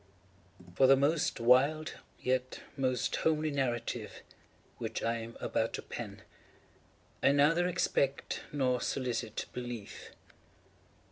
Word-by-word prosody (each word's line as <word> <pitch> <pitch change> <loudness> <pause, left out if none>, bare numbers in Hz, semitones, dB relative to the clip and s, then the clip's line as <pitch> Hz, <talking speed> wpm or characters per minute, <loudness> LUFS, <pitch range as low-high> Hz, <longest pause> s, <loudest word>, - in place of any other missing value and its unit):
For 130 +8 +5
the 135 - +8
most 145 +2 +1
wild, 135 +7 +4 0.3
yet 130 0 -1
most 130 -3 0
homely 155 -1 +1
narrative 120 -4 -2 0.6
which - - -3
I 115 +1 +1
am 115 0 -8
about - - -1
to - - -4
pen, - - -7 1.0
I - - +5
neither 160 +5 +4
expect 140 -6 0
nor 130 -4 +1
solicit 120 -4 -2
belief. 120 -4 -6
130 Hz, 110 wpm, -32 LUFS, 120-145 Hz, 1.0 s, the